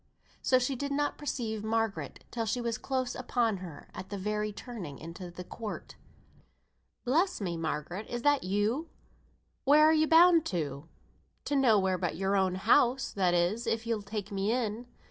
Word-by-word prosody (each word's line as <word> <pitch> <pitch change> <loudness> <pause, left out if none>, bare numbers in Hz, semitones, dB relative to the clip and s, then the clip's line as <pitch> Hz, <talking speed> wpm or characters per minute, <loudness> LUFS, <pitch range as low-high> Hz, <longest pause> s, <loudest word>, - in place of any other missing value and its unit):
So 255 - +4
she 255 +2 0
did 280 +3 -3
not 290 +1 -1
perceive 230 -7 -3
Margaret 225 -1 -2
till, 230 -2 -2
she 225 +4 0
was 235 -2 -2
close 260 -2 -2
upon 240 -4 0
her 175 -5 -9
at 185 - -8
the 205 - -4
very 210 +2 -1
turning 205 - -7
into 170 +2 -8
the 175 +1 -8
court. 215 +3 -7 1.1
"Bless 330 +10 +2
me, 180 -5 -2
Margaret! 165 +5 -3
is 240 0 -4
that 290 -1 +3
you? 210 - 0 0.7
Where 300 +2 +6
are 315 - +6
you 310 0 +3
bound 335 0 +7
to?" 150 -5 -3 0.6
"To 290 - 0
nowhere 205 -9 +3
but 175 -4 -1
your 195 +2 +1
own 190 -2 +2
house 245 +6 +3
(that 180 -3 +2
is, 185 +8 +1
if 225 +1 0
you'll 230 -2 -1
take 205 +1 -5
me 200 +2 0
in). 235 -1 -2
220 Hz, 170 wpm, -30 LUFS, 190-255 Hz, 1.1 s, bound